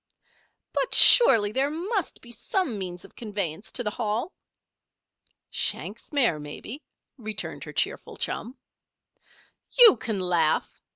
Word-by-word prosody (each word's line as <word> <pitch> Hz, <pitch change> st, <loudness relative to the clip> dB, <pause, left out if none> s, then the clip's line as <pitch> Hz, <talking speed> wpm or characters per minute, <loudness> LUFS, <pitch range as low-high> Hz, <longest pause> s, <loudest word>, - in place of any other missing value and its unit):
"But -, -, 0 dB
surely 225 Hz, -, +7 dB
there 270 Hz, +5 st, +1 dB
must 365 Hz, +5 st, -3 dB
be 240 Hz, -, -13 dB
some 275 Hz, -, -2 dB
means 180 Hz, -2 st, -6 dB
of -, -, -18 dB
conveyance 200 Hz, -5 st, -4 dB
to 245 Hz, -, -2 dB
the 210 Hz, -, -2 dB
Hall!" 230 Hz, -, -3 dB, 1.2 s
"Shank's -, -, -1 dB
mare, 240 Hz, -, +2 dB
maybe," 150 Hz, -, -8 dB, 0.4 s
returned 215 Hz, -2 st, -5 dB
her -, -, -9 dB
cheerful -, -, -2 dB
chum. 250 Hz, +4 st, -4 dB, 1.2 s
"You 465 Hz, -, +9 dB
can 220 Hz, -2 st, -4 dB
laugh!" 175 Hz, -4 st, 0 dB
225 Hz, 120 wpm, -25 LUFS, 195-285 Hz, 1.2 s, You